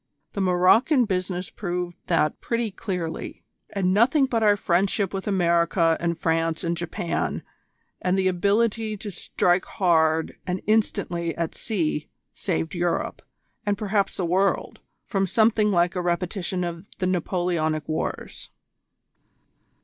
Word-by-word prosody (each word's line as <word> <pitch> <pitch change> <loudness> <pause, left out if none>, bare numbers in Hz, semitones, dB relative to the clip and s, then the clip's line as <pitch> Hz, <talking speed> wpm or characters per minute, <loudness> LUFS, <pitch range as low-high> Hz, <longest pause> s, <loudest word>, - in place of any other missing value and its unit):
The 200 - -2
Maroocan 190 - +4
business 180 -2 -2
proved 175 -2 -3
that 165 -3 +1
pretty 235 -2 -1
clearly; 180 -5 -5 0.3
and 185 -2 0
nothing 265 +7 +4
but 235 -4 0
our 205 -1 +4
friendship 195 +2 +1
with 195 +1 -4
America 170 -3 +3
and 170 -1 -1
France 165 0 0
and 170 0 0
Japan, 170 0 -2 0.6
and 185 +1 +1
the 190 -1 +2
ability 210 +4 +1
to 205 +1 -7
strike 180 0 +1
hard 160 -3 +2
and 180 +1 -1
instantly 195 -6 0
at 170 -1 -2
sea, 160 -8 -2 0.2
saved 160 -4 -2
Europe, 175 -1 -1 0.4
and 205 -1 0
perhaps 205 -1 0
the 185 - -1
world, 190 +3 0 0.3
from 195 -3 0
something 215 +1 +3
like 175 -2 +2
a 180 - 0
repetition 180 +1 -1
of 170 +3 -5
the 185 - -1
Napoleonic 175 -3 0
wars." 155 - -4
180 Hz, 130 wpm, -25 LUFS, 170-200 Hz, 0.6 s, Maroocan